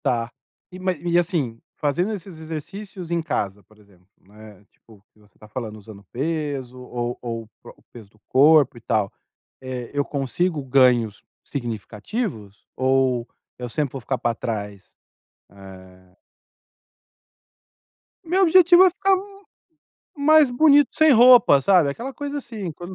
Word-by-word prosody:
Tá. 120 -1 -1 0.4
E 185 - -10
ma 185 0 0
e, 170 +1 -1
assim, 155 - -2 0.2
fazendo 160 +8 -1
esses 190 -4 -9
exercícios 170 +3 -8
em 170 -1 0
casa, 105 - -3
por 110 +3 -25
exemplo, 100 -4 -24
né, 105 0 -16
tipo 105 -3 -22
que - - -28
você 105 -3 -26
tá 105 - -16
falando, 110 -1 -7
usando 100 -1 -13
peso 140 -3 -4
ou 120 -1 -5
ou 115 -2 -5
o 110 - -21
pro - - -13
o - - -27
peso 110 -4 -13
do 105 - -29
corpo 145 -1 +4
e - - -13
tal, 105 -3 -1 0.5
eh, 130 -2 -7
eu 145 0 0
consigo 150 +3 -2
ganhos 125 -5 +2 0.2
significativos 115 - -6
ou 130 -2 +1 0.3
eu 125 -1 -6
sempre 145 +1 -2
vou 135 - -6
ficar 130 +3 -3
pra 120 - -1
trás? 105 -4 -5 0.7
Eh 95 -1 -16 2.1
Meu 360 +3 +1
objetivo 355 +1 +6
é - - +5
ficar 390 +2 +1 1.0
mais 300 -1 +5
bonito 290 +2 +4
sem 315 -1 +5
roupa, 240 - +7
sabe? 175 -1 +3
Aquela 240 - -6
coisa, 290 +2 -5
assim, 220 - -7
quando 175 +4 -10
135 Hz, 145 wpm, -22 LUFS, 110-185 Hz, 2.1 s, roupa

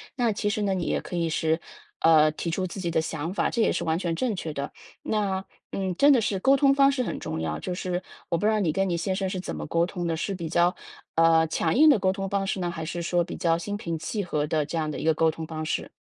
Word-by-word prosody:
那 240 -4 +1
其 205 0 -1
实 210 - -1
呢， 195 -1 +1
你 185 -2 -1
也 - - 0
可 - - -7
以 170 -1 0
是， 160 +1 0 0.4
呃， 155 -1 +6
提 165 +2 -4
出 185 +3 -1
自 190 +2 -7
己 170 -2 -2
的 160 - +2
想 160 +1 -4
法， - - +1
这 235 - 0
也 - - +3
是 - - -2
完 160 0 +1
全 175 -2 -1
正 240 +2 -1
确 165 -4 -4
的。 140 -1 -4 0.3
那， 195 -3 -1 0.3
嗯， 190 -2 -2
真 285 +9 +6
的 265 - +5
是 205 -2 0
沟 270 +7 +4
通 275 0 +5
方 275 0 +5
式 270 -2 -1
很 - - -3
重 80 - -4
要， 80 -1 -2
就 180 - -4
是 180 0 -2 0.3
我 170 - +1
不 190 - -2
知 215 - +4
道 215 - +1
你 175 -6 +1
跟 195 +2 +1
你 170 - 0
先 185 +3 -1
生 190 0 -1
是 185 - -3
怎 180 - -5
么 75 0 -5
沟 170 0 +2
通 180 -1 -5
的。 - - 0
是 195 +4 -2
比 170 -3 -5
较， 175 +1 +3 0.4
呃， 165 0 +5
强 160 +1 0
硬 310 +4 +7
的 280 - +6
沟 185 0 +2
通 195 0 -3
方 200 0 0
式 195 - -2
呢？ 175 -1 -1
还 165 -2 -5
是 170 +1 -4
说 175 +1 +1
比 170 - -7
较 165 -1 +2
心 205 +5 -4
平 170 -5 -3
气 200 +7 -3
和 150 -5 -1
的 155 -1 0
这 155 +3 -4
样 155 -1 -1
的 - - -5
一 - - -5
个 160 - +4
沟 160 +1 +3
通 160 0 -6
方 155 -1 -5
式？ 155 - -3
175 Hz, 320 characters per minute, -26 LUFS, 160-195 Hz, 0.4 s, 硬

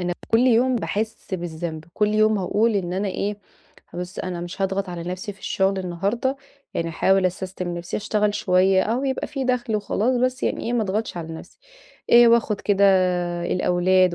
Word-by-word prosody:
أنا 180 0 -1 0.2
كُل 225 - +4
يوم 250 +1 +3
باحس 220 -3 -3
بالذنب، 165 -2 -5
كل 210 -1 +2
يوم 215 0 +3
هاقول 210 +4 +1
إن 180 -3 -2
أنا 195 +2 -1
إيه 200 +2 -3 0.6
بُص 180 +2 -6
أنا 180 -1 -4
مش 175 +3 -5
هاضغط 195 0 -1
على 175 -1 -5
نفسي 180 +4 -5
في 200 - -22
الشغل 195 0 0
النهارده، 200 +9 -1 0.4
يعني 165 - -1
هاحاول 190 +3 +2
أسستم 185 -1 -4
نفسي 170 - -4
أشتغل 210 0 0
شوية 190 +1 +3
أهو 240 +5 -1
يبقى 265 -1 -1
في 275 -3 -4
دخل 245 -3 0
وخلاص 215 +4 0
بس 255 +1 0
يعني - - -1
إيه 235 - -1
ما 240 -2 +1
أضغطش 210 0 -2
على 165 -1 -5
نفسي. - - -12 0.5
آآ 240 0 +8
وآخد 230 -3 +2
كده 200 -1 +2 0.6
الأولاد 180 0 +2
195 Hz, 180 wpm, -23 LUFS, 180-225 Hz, 0.6 s, آآ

